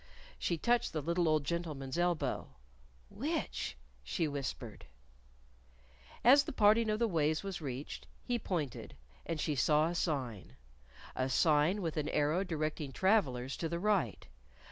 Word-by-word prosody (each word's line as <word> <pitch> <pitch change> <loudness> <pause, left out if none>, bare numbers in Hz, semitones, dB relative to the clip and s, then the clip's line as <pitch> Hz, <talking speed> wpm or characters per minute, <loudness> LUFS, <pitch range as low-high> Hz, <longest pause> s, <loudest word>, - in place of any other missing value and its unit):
She 170 - 0
touched 240 +6 +1
the 155 - -1
little 170 +1 +1
old 155 -1 +2
gentleman's 145 -4 -3
elbow. 175 - -1 0.5
"Which?" - - -3 0.3
she 70 - -1
whispered. 135 -5 -5 1.4
As 280 +4 +7
the - - -4
parting 220 -1 +4
of 215 - +1
the 235 +1 +2
ways 160 -3 +1
was 195 -3 -5
reached, 135 -1 -6 0.2
he 245 -1 -1
pointed. 155 - -3 0.3
And 165 -2 -2
she 150 - 0
saw 150 +4 +3
a - - -3
sign 130 - -2 0.6
a 130 0 0
sign 155 +7 +3
with 165 -1 -2
an 150 -1 -1
arrow 150 +6 +1
directing 155 -4 -3
travelers 135 - +1
to 165 - -2
the 170 - -2
right. 190 - 0
160 Hz, 145 wpm, -33 LUFS, 145-185 Hz, 1.4 s, As